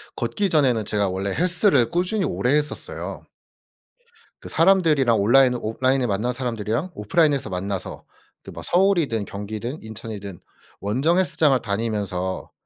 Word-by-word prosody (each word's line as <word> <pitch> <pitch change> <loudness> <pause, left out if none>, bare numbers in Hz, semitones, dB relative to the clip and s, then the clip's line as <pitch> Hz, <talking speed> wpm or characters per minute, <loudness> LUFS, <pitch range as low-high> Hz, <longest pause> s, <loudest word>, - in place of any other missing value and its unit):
걷기 200 -2 0
전에는 130 -9 +2
제가 100 -2 0
원래 95 +2 -3
헬스를 180 - +3
꾸준히 185 - 0
오래 125 -7 0
했었어요. 150 0 -3 1.1
그 - - -9
사람들이랑 160 - +3
온라인 125 +5 +5
온라인에서 130 +3 0
만난 110 +4 -1
사람들이랑 120 - -3
오프라인에서 145 - +1
만나서 95 +1 -4 0.4
그 - - -10
막 - - -9
서울이든 175 - +2
경기든 110 +8 -6
인천이든 105 -3 -8 0.4
원정 135 - +1
헬스장을 155 -7 +3
다니면서 100 -3 -3
120 Hz, 350 characters per minute, -23 LUFS, 105-155 Hz, 1.1 s, 온라인